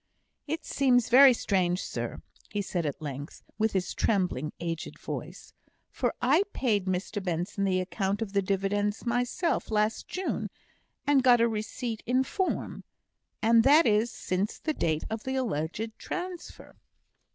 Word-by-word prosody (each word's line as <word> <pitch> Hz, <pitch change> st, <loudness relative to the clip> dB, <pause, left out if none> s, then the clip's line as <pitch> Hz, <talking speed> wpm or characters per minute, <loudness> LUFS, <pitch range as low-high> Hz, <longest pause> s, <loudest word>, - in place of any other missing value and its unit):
"It 320 Hz, +3 st, -3 dB
seems 250 Hz, -4 st, +2 dB
very 265 Hz, +2 st, +9 dB
strange, 185 Hz, -6 st, +1 dB
sir," -, -, -5 dB, 0.3 s
he 205 Hz, -1 st, -2 dB
said 175 Hz, -4 st, -2 dB
at 145 Hz, +2 st, -5 dB
length, 145 Hz, 0 st, -7 dB, 0.2 s
with 220 Hz, 0 st, +2 dB
his 190 Hz, -2 st, -1 dB
trembling, 180 Hz, -, 0 dB
aged 165 Hz, -1 st, -4 dB
voice, -, -, -7 dB, 0.4 s
"for -, -, -1 dB
I 280 Hz, +8 st, +4 dB
paid 210 Hz, -7 st, 0 dB
Mr 185 Hz, +2 st, -2 dB
Benson 180 Hz, +3 st, -1 dB
the 185 Hz, -1 st, +2 dB
account 190 Hz, +2 st, -1 dB
of 220 Hz, -3 st, -4 dB
the 200 Hz, -, +3 dB
dividends 205 Hz, +2 st, -1 dB
myself 245 Hz, +8 st, 0 dB
last 215 Hz, 0 st, 0 dB
June, 375 Hz, +1 st, -3 dB, 0.6 s
and 285 Hz, -2 st, +4 dB
got 250 Hz, -2 st, +6 dB
a 230 Hz, -, +4 dB
receipt 220 Hz, +1 st, -4 dB
in 255 Hz, +2 st, +3 dB
form, 375 Hz, +7 st, -2 dB, 0.6 s
and 225 Hz, 0 st, +6 dB
that 300 Hz, +5 st, +6 dB
is 215 Hz, +2 st, +3 dB
since 195 Hz, -1 st, -2 dB
the 310 Hz, -, -2 dB
date 160 Hz, -, 0 dB
of 220 Hz, 0 st, -4 dB
the 265 Hz, 0 st, -2 dB
alleged 215 Hz, -, -2 dB
transfer." 360 Hz, -1 st, -7 dB
215 Hz, 150 wpm, -28 LUFS, 185-245 Hz, 0.6 s, very